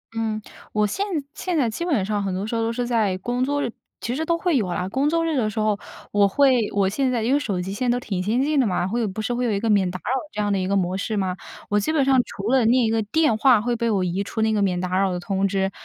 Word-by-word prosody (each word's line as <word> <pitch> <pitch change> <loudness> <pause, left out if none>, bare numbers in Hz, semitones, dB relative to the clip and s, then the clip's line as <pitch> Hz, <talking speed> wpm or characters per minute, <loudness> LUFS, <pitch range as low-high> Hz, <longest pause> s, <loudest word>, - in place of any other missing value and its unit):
嗯， 220 -1 -1 0.3
我 210 0 +2
现 390 - -1 0.3
现 360 -3 -2
在 270 -5 +2
基 225 +10 -4
本 265 - +1
上 210 -1 -1
很 195 -2 -2
多 190 +2 -2
时 220 - -5
候 230 - 0
都 225 0 0
是 245 +1 -2
在 220 -6 +1
工 245 +6 -2
作 285 +2 0
日 235 - -2 0.3
其 240 +2 -3
实 315 - -1
都 335 +1 +1
会 345 -4 +1
有 210 -6 0
啊 180 +1 -2
工 270 +7 +1
作 330 0 +1
日 325 -2 0
的 215 -4 +1
时 215 - -4
候 215 -1 +1 0.3
我 205 -1 +4
会 255 -1 +3
我 200 -2 +2
现 260 +6 0
在 235 -3 0
因 245 +4 +2
为 285 - +4
手 200 -10 -2
机 190 +2 -5
现 245 +5 -1
在 240 - +3
都 245 - -1
挺 195 -6 -3
先 215 +6 0
进 295 -1 +1
的 250 - +3
嘛。 180 -2 0
会 235 +5 -1
有 225 - 0
不 205 +2 -4
是 245 - -1
会 245 +1 -1
有 235 - +1
一 200 - 0
个 225 - -1
免 195 -3 +3
打 180 - -5
扰 - - -4 0.2
这 - - -5
样 205 0 0
的 195 - +1
一 185 - -1
个 200 - +1
模 185 -1 0
式 215 +2 -2
吗？ 185 -2 -1 0.3
我 205 - +2
基 210 - -1
本 310 -3 +2
上 270 -1 +4
除 200 +4 -4
了 260 -2 +4
那 230 - +4
一 235 -3 +3
个 225 0 +1
电 230 +4 +2
话 250 -2 +5
会 240 +2 -1
被 235 0 -1
我 200 -4 +1
移 180 +2 -1
出 220 - -4
那 220 - +2
个 210 - +1
免 185 -3 +1
打 185 +1 -1
扰 195 -1 +2
的 180 - -2
通 195 +2 0
知， 195 0 0
220 Hz, 340 characters per minute, -23 LUFS, 195-250 Hz, 0.3 s, 话